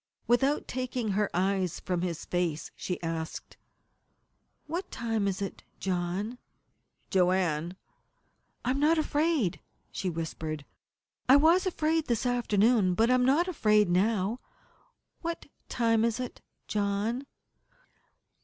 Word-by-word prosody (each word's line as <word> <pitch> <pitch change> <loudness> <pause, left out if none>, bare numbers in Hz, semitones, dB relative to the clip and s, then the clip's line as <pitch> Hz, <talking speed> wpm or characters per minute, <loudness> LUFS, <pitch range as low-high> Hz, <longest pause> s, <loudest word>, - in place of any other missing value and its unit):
Without 270 +5 +2
taking 250 -3 -2
her 205 +1 +1
eyes 185 -1 0
from 180 -2 -2
his 175 -2 -3
face 175 -4 -1
she 180 - -4
asked: 165 -1 -4 1.1
"What 350 +5 -4
time 225 -3 -1
is 195 0 -1
it. 195 - -6 0.2
John?" 190 +6 -2 0.7
"Joanne 180 -3 +2 0.4
" - - -29
"I 250 - +2
am 270 - 0
not 310 +3 +4
afraid," 300 - +1 0.3
she 185 - -2
whispered. 160 -2 -4 0.6
"I 265 - +9
was 330 +6 +5
afraid 320 -2 0
this 235 0 0
afternoon, 225 -5 +3
but 225 +5 +3
I - - +6
am 250 0 +3
not 300 +7 +3
afraid 215 - +3
now. 205 +4 +1 0.8
What 335 0 -4 0.2
time 230 -2 +2
is 235 +1 +1
it, 250 -1 -5 0.3
John?" 210 +6 -1
215 Hz, 125 wpm, -29 LUFS, 180-255 Hz, 1.1 s, I